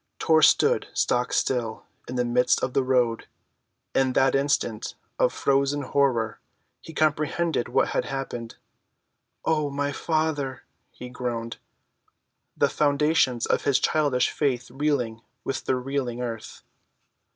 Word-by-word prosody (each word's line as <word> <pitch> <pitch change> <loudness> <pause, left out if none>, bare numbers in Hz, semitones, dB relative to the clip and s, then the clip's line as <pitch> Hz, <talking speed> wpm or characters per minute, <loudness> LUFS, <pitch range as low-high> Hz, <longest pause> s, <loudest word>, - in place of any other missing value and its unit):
Tor 160 -1 +3
stood - - +4
stock‐still 120 -1 0 0.2
in 125 - -5
the 125 -1 +1
midst 125 +1 +2
of 130 - -1
the 135 - +3
road. 125 -3 +1 0.7
In 130 -1 +2
that 135 +1 +3
instant 135 -5 0 0.2
of - - +3
frozen 140 +1 +1
horror 125 -6 +1 0.4
he - - -10
comprehended 155 -1 0
what - - +2
had - - -1
happened. 120 -4 -5 0.9
"Oh, 155 -2 +1
my 145 0 -2
Father," 155 -3 -1 0.3
he 125 - -10
groaned, 120 -2 -4 1.0
the - - +4
foundations 145 -4 +2
of - - 0
his 140 -2 +4
childish 145 -5 +1
faith 125 -5 -1
reeling 130 -5 -1 0.2
with 135 -1 -3
the 130 - +1
reeling 125 -2 -3
earth. 115 -3 -6
135 Hz, 125 wpm, -25 LUFS, 125-145 Hz, 1.0 s, stood